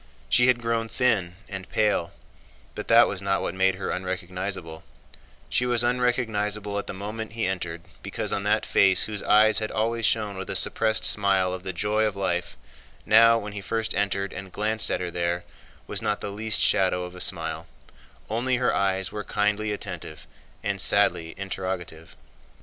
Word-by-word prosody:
She 125 Hz, +1 st, +4 dB
had 125 Hz, -1 st, +4 dB
grown 115 Hz, -1 st, -1 dB
thin 110 Hz, -8 st, +1 dB
and 95 Hz, -2 st, -7 dB
pale, 105 Hz, -6 st, +1 dB, 0.6 s
but -, -, -7 dB
that 115 Hz, +1 st, +7 dB
was 100 Hz, -, -3 dB
not 95 Hz, 0 st, 0 dB
what -, -, -2 dB
made 95 Hz, 0 st, +2 dB
her 95 Hz, -, -4 dB
unrecognizable; 90 Hz, -2 st, -4 dB, 0.6 s
she 125 Hz, -, 0 dB
was 120 Hz, -1 st, +2 dB
unrecognizable 110 Hz, -4 st, 0 dB
at -, -, -7 dB
the -, -, -4 dB
moment 110 Hz, +3 st, -6 dB
he 115 Hz, -1 st, -1 dB
entered 85 Hz, -3 st, -3 dB, 0.2 s
because -, -, -2 dB
on 100 Hz, -, 0 dB
that 105 Hz, +2 st, +1 dB
face 95 Hz, -2 st, +4 dB
whose 105 Hz, -2 st, -3 dB
eyes 110 Hz, 0 st, +5 dB
had 110 Hz, -1 st, -3 dB
always 115 Hz, +1 st, -1 dB
shone 105 Hz, -3 st, 0 dB
with 95 Hz, -, -6 dB
a -, -, -2 dB
suppressed 110 Hz, -1 st, +1 dB
smile 95 Hz, -3 st, +3 dB
of 95 Hz, -, -5 dB
the 95 Hz, -, -2 dB
joy 105 Hz, +5 st, 0 dB
of 105 Hz, -2 st, 0 dB
life, 90 Hz, -3 st, -2 dB, 0.5 s
now 115 Hz, +1 st, +6 dB
when 105 Hz, -2 st, -6 dB
he 100 Hz, -, -6 dB
first 110 Hz, +3 st, -2 dB
entered 100 Hz, -1 st, -1 dB
and 95 Hz, -1 st, -8 dB
glanced 110 Hz, +2 st, +1 dB
at -, -, 0 dB
her 90 Hz, -1 st, -3 dB
there 85 Hz, 0 st, -1 dB, 0.4 s
was -, -, -3 dB
not 105 Hz, -2 st, 0 dB
the 100 Hz, -, -5 dB
least 110 Hz, +1 st, +1 dB
shadow 90 Hz, -1 st, +2 dB
of 90 Hz, 0 st, -8 dB
a 90 Hz, -, -8 dB
smile: -, -, -2 dB, 0.6 s
only 120 Hz, +4 st, 0 dB
her 125 Hz, 0 st, +1 dB
eyes 95 Hz, -1 st, 0 dB
were 105 Hz, -1 st, -5 dB
kindly 105 Hz, +1 st, 0 dB
attentive 85 Hz, -6 st, -6 dB, 0.4 s
and 100 Hz, -2 st, -1 dB
sadly 85 Hz, -4 st, +3 dB
interrogative. 95 Hz, -4 st, -5 dB
100 Hz, 180 wpm, -25 LUFS, 95-110 Hz, 0.6 s, that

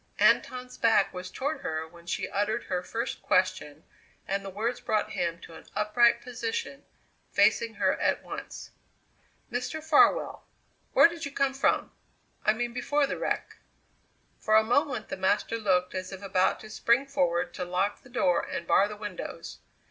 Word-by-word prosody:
Anton's 250 Hz, 0 st, +2 dB
back 225 Hz, -3 st, +3 dB
was 180 Hz, 0 st, -6 dB
toward 285 Hz, +8 st, -3 dB
her 160 Hz, 0 st, -3 dB
when 170 Hz, +1 st, -17 dB
she -, -, -2 dB
uttered 210 Hz, +3 st, -1 dB
her 180 Hz, -1 st, -2 dB
first 230 Hz, +7 st, -4 dB
question 165 Hz, -5 st, 0 dB, 0.4 s
and 195 Hz, 0 st, -1 dB
the 195 Hz, -, -6 dB
words 225 Hz, +6 st, -2 dB
brought 215 Hz, -1 st, 0 dB
him 170 Hz, -1 st, -2 dB
to 165 Hz, -, -12 dB
an -, -, -13 dB
upright 235 Hz, +3 st, +3 dB
position, 450 Hz, -, -4 dB, 0.5 s
facing 465 Hz, -1 st, +3 dB
her -, -, +2 dB
at -, -, +1 dB
once. -, -, -8 dB, 0.8 s
"Mr. 250 Hz, +6 st, -3 dB
Farwell, 315 Hz, -1 st, +3 dB, 0.5 s
where -, -, +8 dB
did 335 Hz, -1 st, -8 dB
you 280 Hz, -, -4 dB
come 275 Hz, -1 st, +1 dB
from 270 Hz, +2 st, +1 dB, 0.5 s
I -, -, +4 dB
mean 240 Hz, +1 st, -3 dB
before 290 Hz, +3 st, +1 dB
the -, -, -4 dB
wreck?" -, -, -2 dB, 0.8 s
For 215 Hz, -, +2 dB
a 220 Hz, -, +7 dB
moment 260 Hz, +4 st, 0 dB
the -, -, -4 dB
master 200 Hz, +4 st, 0 dB
looked 185 Hz, -4 st, +1 dB
as 185 Hz, 0 st, -4 dB
if 190 Hz, +1 st, -8 dB
about 190 Hz, -1 st, +1 dB
to 215 Hz, -, -11 dB
spring 235 Hz, +5 st, +2 dB
forward 180 Hz, -9 st, 0 dB
to -, -, -4 dB
lock 180 Hz, +3 st, -1 dB
the 250 Hz, -, -17 dB
door 180 Hz, -8 st, +2 dB
and 185 Hz, -2 st, -5 dB
bar 195 Hz, +3 st, +4 dB
the 210 Hz, 0 st, -8 dB
windows. 205 Hz, -4 st, -7 dB
210 Hz, 170 wpm, -28 LUFS, 185-250 Hz, 0.8 s, where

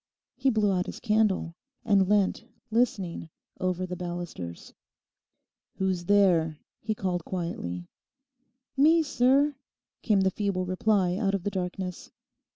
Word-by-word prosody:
He 265 Hz, +1 st, +2 dB
blew 215 Hz, -4 st, +2 dB
out 180 Hz, -1 st, 0 dB
his -, -, -6 dB
candle 210 Hz, -6 st, +1 dB, 0.3 s
and 195 Hz, -3 st, +3 dB
leant 205 Hz, -2 st, +2 dB, 0.3 s
listening 200 Hz, -8 st, 0 dB, 0.3 s
over 185 Hz, -1 st, -1 dB
the 180 Hz, 0 st, -5 dB
balusters. 175 Hz, -, -6 dB, 1.0 s
'Who's 185 Hz, -2 st, -1 dB
there?' 175 Hz, -6 st, +3 dB, 0.2 s
he 215 Hz, 0 st, -2 dB
called 180 Hz, -4 st, -2 dB
quietly. 90 Hz, -, -4 dB, 0.9 s
'Me, 320 Hz, +4 st, +5 dB
sir,' 280 Hz, +1 st, +3 dB, 0.4 s
came 205 Hz, -4 st, +3 dB
the 190 Hz, 0 st, +2 dB
feeble 195 Hz, -2 st, -1 dB
reply 185 Hz, -1 st, +1 dB
out 200 Hz, -2 st, +1 dB
of 190 Hz, -, -3 dB
the 205 Hz, -, -1 dB
darkness. 180 Hz, -1 st, -4 dB
190 Hz, 125 wpm, -27 LUFS, 180-215 Hz, 1.0 s, Me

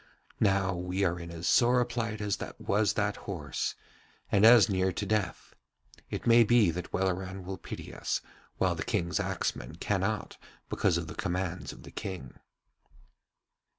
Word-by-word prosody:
Now 95 Hz, -2 st, +2 dB
we 90 Hz, +2 st, -2 dB
are 90 Hz, -2 st, +1 dB
in 85 Hz, 0 st, -7 dB
as 85 Hz, 0 st, -6 dB
sore 125 Hz, +1 st, +5 dB
a 125 Hz, -, +3 dB
plight 115 Hz, -3 st, -3 dB
as 105 Hz, -2 st, -1 dB, 0.2 s
was 105 Hz, +1 st, +1 dB
that 105 Hz, -1 st, 0 dB
horse, 75 Hz, -9 st, -3 dB, 0.6 s
and 105 Hz, +2 st, +6 dB
as 115 Hz, -1 st, +8 dB
near 95 Hz, -2 st, +1 dB
to 100 Hz, +4 st, -3 dB
death; 100 Hz, -3 st, -2 dB, 0.6 s
it -, -, -4 dB
may 115 Hz, 0 st, +7 dB
be 115 Hz, -5 st, +4 dB
that 90 Hz, +1 st, -6 dB
Welleran 95 Hz, 0 st, -1 dB
will 95 Hz, 0 st, -6 dB
pity -, -, -8 dB
us, -, -, -1 dB, 0.4 s
while -, -, +2 dB
the -, -, -5 dB
King's 85 Hz, 0 st, -1 dB
axeman -, -, -2 dB
cannot -, -, -2 dB, 0.3 s
because 90 Hz, -3 st, +2 dB
of 85 Hz, -, -3 dB
the 75 Hz, -, -7 dB
commands 90 Hz, +1 st, -3 dB
of -, -, -13 dB
the -, -, -11 dB
King.' 90 Hz, -10 st, -6 dB
95 Hz, 160 wpm, -30 LUFS, 90-105 Hz, 0.6 s, as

